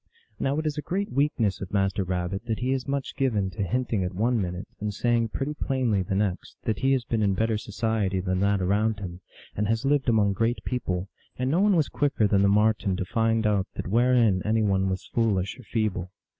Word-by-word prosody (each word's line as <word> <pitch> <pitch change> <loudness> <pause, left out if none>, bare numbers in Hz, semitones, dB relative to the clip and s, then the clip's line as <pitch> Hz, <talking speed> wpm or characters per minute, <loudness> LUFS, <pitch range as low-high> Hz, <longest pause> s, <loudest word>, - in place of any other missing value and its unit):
Now 135 +2 0
it 155 - -2
is 150 -1 -1
a - - -2
great 195 +6 -2
weakness 125 -7 +1
of 95 - -6
Master 95 -1 +1
Rabbit 90 +3 -3
that 110 -2 -1
he 125 +1 -1
is 130 -1 -1
much 140 -1 -2
given 105 -8 0
to 90 - -5
hinting 115 0 0
at 90 0 -3
one 115 +3 +1
minute, 90 0 -4
and 105 0 -2
saying 115 +2 +1
pretty 140 +6 -3
plainly 130 -9 0
the 95 +1 -2
next, 100 -2 -2
that 110 - -1
he 135 +1 +3
has 130 -3 0
been 115 -2 -1
in 100 -2 +2
better 110 +2 +1
so 105 - -6
ciety 105 -3 0
than 90 0 -1
that 100 -1 +2
around 105 +3 +1
him, 90 -2 -7 0.3
and 105 +1 0
has 115 +3 0
lived 140 -2 +2
among 105 -3 +3
great 115 +3 0
people, 95 -7 -2 0.3
and 130 +1 0
no 165 - +2
one 205 -1 +4
was 160 -4 +2
quicker 145 -7 +1
than 100 -1 +3
the 100 - +4
Marten 105 -2 +2
to 90 - -2
find 115 +2 +1
out 100 -3 +2
that - - -4
wherein 115 -2 +3
any 110 +1 +1
one 95 -2 +2
was 95 0 -3
foolish 100 -3 0
or - - -11
feeble. 105 -6 -1
110 Hz, 225 wpm, -26 LUFS, 95-125 Hz, 0.3 s, one